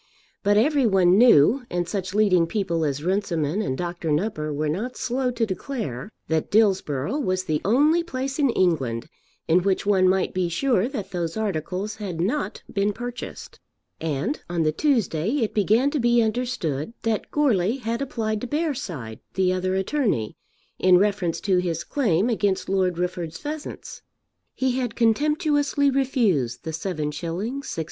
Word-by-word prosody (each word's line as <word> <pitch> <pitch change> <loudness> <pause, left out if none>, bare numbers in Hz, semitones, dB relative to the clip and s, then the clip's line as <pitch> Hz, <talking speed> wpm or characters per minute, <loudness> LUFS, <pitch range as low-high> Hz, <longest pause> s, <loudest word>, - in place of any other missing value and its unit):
But 205 0 +3
every 275 +2 +3
one 185 -3 +4
knew, 240 - +6
and 175 -1 -1
such 195 -1 -3
leading 185 -6 +4
people 170 -4 -1
as 145 -1 -2
Runciman 175 -2 0
and 130 -11 -2
Dr. 175 -2 -4
Nupper 155 -2 -1
were 150 +1 -1
not 210 +12 -3
slow 250 +1 -1
to 240 -2 0
declare, 205 - -5 0.2
that 160 -1 0
Dillsborough 195 - +1
was 185 -8 0
the 155 -4 -1
only 295 - +4
place 270 -3 -4
in 280 -3 +3
England 140 - 0 0.4
in 170 +3 +4
which 195 +1 0
one 190 -2 +4
might 190 0 +1
be 185 -2 0
sure 230 +3 +1
that 235 -9 -5
those 170 0 -3
articles 200 +1 -3
had 190 -6 -5
not 230 - -2
been 205 0 +1
purchased. 245 +2 -7 0.4
And 165 - -2
on 170 -2 0
the 155 - +2
Tuesday 205 - +1
it 215 - -2
began 220 +7 +3
to 300 - -1
be 240 -1 +4
understood 220 - -2
that 225 -2 -1
Goarly 235 -7 +2
had 235 0 -3
applied 220 -5 -2
to 250 - -4
Bearside, 205 - -3 0.2
the 185 -1 +2
other 185 0 -1
attorney, 190 - 0 0.4
in 185 -1 +6
reference 195 -3 +1
to 190 -3 +2
his 170 -2 -2
claim 210 - +1
against 205 -5 0
Lord 185 -3 +1
Rufford's 175 -2 -3
pheasants. 300 0 -7 0.5
He 260 -1 0
had 245 -3 -3
contemptuously 290 +4 +2
refused 220 - +1
the 160 - -4
7_s._ 155 -3 -3
6_d. 205 +12 -4
200 Hz, 155 wpm, -24 LUFS, 170-245 Hz, 0.5 s, knew